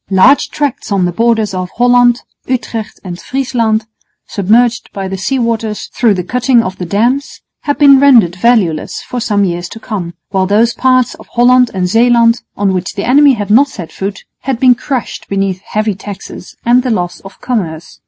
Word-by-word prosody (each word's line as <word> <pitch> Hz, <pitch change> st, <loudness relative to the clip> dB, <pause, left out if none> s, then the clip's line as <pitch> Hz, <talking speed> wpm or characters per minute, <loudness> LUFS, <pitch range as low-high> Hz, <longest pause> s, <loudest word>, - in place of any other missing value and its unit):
Large 200 Hz, +9 st, +4 dB
tracts 285 Hz, -7 st, -3 dB
on 195 Hz, -2 st, +1 dB
the 175 Hz, -, -1 dB
borders 225 Hz, 0 st, 0 dB
of 185 Hz, -1 st, -4 dB
Holland, 245 Hz, 0 st, +3 dB, 0.2 s
Utrecht 230 Hz, -4 st, -4 dB
and 175 Hz, -2 st, -7 dB
Friesland, 230 Hz, -5 st, -1 dB, 0.4 s
submerged 230 Hz, +4 st, +1 dB
by 195 Hz, -1 st, -4 dB
the 190 Hz, -, -4 dB
sea 265 Hz, +8 st, -1 dB
waters 230 Hz, -3 st, -2 dB
through 225 Hz, -5 st, +2 dB
the 180 Hz, -, -3 dB
cutting 250 Hz, +3 st, +1 dB
of 185 Hz, -1 st, -6 dB
the 180 Hz, -, -4 dB
dams, 240 Hz, +9 st, -1 dB, 0.2 s
had 290 Hz, -, 0 dB
been 280 Hz, -2 st, +6 dB
rendered 235 Hz, -11 st, +5 dB
valueless 190 Hz, -7 st, 0 dB
for 250 Hz, -, -5 dB
some 205 Hz, -3 st, 0 dB
years 175 Hz, -1 st, -3 dB
to 225 Hz, -, -10 dB
come, 185 Hz, -7 st, -5 dB
while 190 Hz, -1 st, 0 dB
those 225 Hz, +4 st, +2 dB
parts 255 Hz, -2 st, +2 dB
of -, -, -15 dB
Holland 250 Hz, 0 st, +3 dB
and 180 Hz, -1 st, 0 dB
Zeeland 230 Hz, +3 st, +3 dB, 0.2 s
on 195 Hz, -1 st, +1 dB
which 185 Hz, +1 st, -3 dB
the 200 Hz, -, -3 dB
enemy 280 Hz, +2 st, +5 dB
had 205 Hz, -3 st, -3 dB
not 270 Hz, +6 st, +5 dB
set 180 Hz, -11 st, -9 dB
foot 195 Hz, 0 st, -5 dB, 0.2 s
had 265 Hz, -3 st, -3 dB
been 255 Hz, -1 st, +5 dB
crushed 255 Hz, 0 st, -5 dB
beneath 195 Hz, -2 st, -1 dB
heavy 215 Hz, +1 st, -2 dB
taxes 195 Hz, -1 st, -10 dB
and 245 Hz, +2 st, +4 dB
the 255 Hz, -, -3 dB
loss 180 Hz, -6 st, -2 dB
of 195 Hz, -, -14 dB
commerce. 170 Hz, -10 st, -4 dB
225 Hz, 185 wpm, -13 LUFS, 190-245 Hz, 0.4 s, been